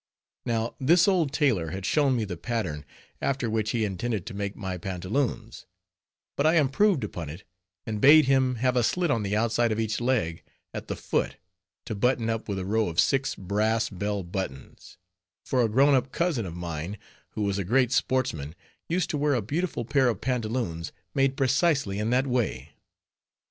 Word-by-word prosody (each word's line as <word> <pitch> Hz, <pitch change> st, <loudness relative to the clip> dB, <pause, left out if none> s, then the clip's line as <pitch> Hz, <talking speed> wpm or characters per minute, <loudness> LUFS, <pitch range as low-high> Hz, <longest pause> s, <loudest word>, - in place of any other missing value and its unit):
Now, 115 Hz, 0 st, -1 dB
this 165 Hz, +7 st, +4 dB
old 175 Hz, -8 st, +2 dB
tailor 125 Hz, -, +1 dB
had 95 Hz, +3 st, -5 dB
shown 140 Hz, -4 st, +2 dB
me 115 Hz, -3 st, 0 dB
the 95 Hz, -3 st, -5 dB
pattern, 85 Hz, -8 st, -3 dB, 0.4 s
after 130 Hz, -4 st, -1 dB
which 110 Hz, -1 st, 0 dB
he 115 Hz, -1 st, 0 dB
intended 105 Hz, 0 st, -3 dB
to 115 Hz, -, -7 dB
make 100 Hz, 0 st, -4 dB
my 95 Hz, -3 st, -4 dB
pantaloons; 110 Hz, +6 st, -3 dB, 0.7 s
but 140 Hz, -, 0 dB
I 160 Hz, -, +4 dB
improved 155 Hz, -, +3 dB
upon 85 Hz, -7 st, -5 dB
it, 85 Hz, +7 st, -9 dB, 0.4 s
and 105 Hz, -2 st, -4 dB
bade 150 Hz, +2 st, +8 dB
him 130 Hz, -1 st, +3 dB
have 125 Hz, +2 st, +1 dB
a 125 Hz, -, +4 dB
slit 175 Hz, +7 st, +1 dB
on 115 Hz, -, +1 dB
the 105 Hz, +1 st, -1 dB
outside 115 Hz, +1 st, +1 dB
of 110 Hz, -, -1 dB
each 110 Hz, +1 st, -1 dB
leg, 115 Hz, -10 st, 0 dB, 0.3 s
at -, -, -6 dB
the -, -, -3 dB
foot, -, -, -2 dB, 0.5 s
to -, -, -4 dB
button 115 Hz, +1 st, +1 dB
up 115 Hz, -1 st, -4 dB
with 100 Hz, -, -2 dB
a 95 Hz, -, -3 dB
row 110 Hz, +2 st, +1 dB
of 85 Hz, -, -2 dB
six 135 Hz, 0 st, +2 dB
brass 110 Hz, +4 st, 0 dB
bell 100 Hz, +1 st, -2 dB
buttons; 85 Hz, -7 st, -7 dB, 0.5 s
for 130 Hz, -, +1 dB
a 115 Hz, -, +2 dB
grown 135 Hz, +6 st, +4 dB
up 130 Hz, 0 st, +1 dB
cousin 160 Hz, -, 0 dB
of 85 Hz, -, -7 dB
mine, 85 Hz, +2 st, -5 dB, 0.4 s
who 105 Hz, -, -2 dB
was 100 Hz, -1 st, 0 dB
a -, -, -1 dB
great 125 Hz, +5 st, +2 dB
sportsman, 85 Hz, -, 0 dB, 0.3 s
used 175 Hz, +1 st, 0 dB
to 150 Hz, -, -2 dB
wear 145 Hz, -1 st, +2 dB
a 120 Hz, -, 0 dB
beautiful 150 Hz, -, -2 dB
pair 130 Hz, +1 st, +3 dB
of 110 Hz, -, -2 dB
pantaloons, 115 Hz, -9 st, -2 dB, 0.2 s
made 135 Hz, -1 st, +1 dB
precisely 135 Hz, -, +2 dB
in 105 Hz, +1 st, -1 dB
that 130 Hz, +2 st, +2 dB
way. 125 Hz, -4 st, -1 dB
115 Hz, 185 wpm, -27 LUFS, 100-135 Hz, 0.7 s, bade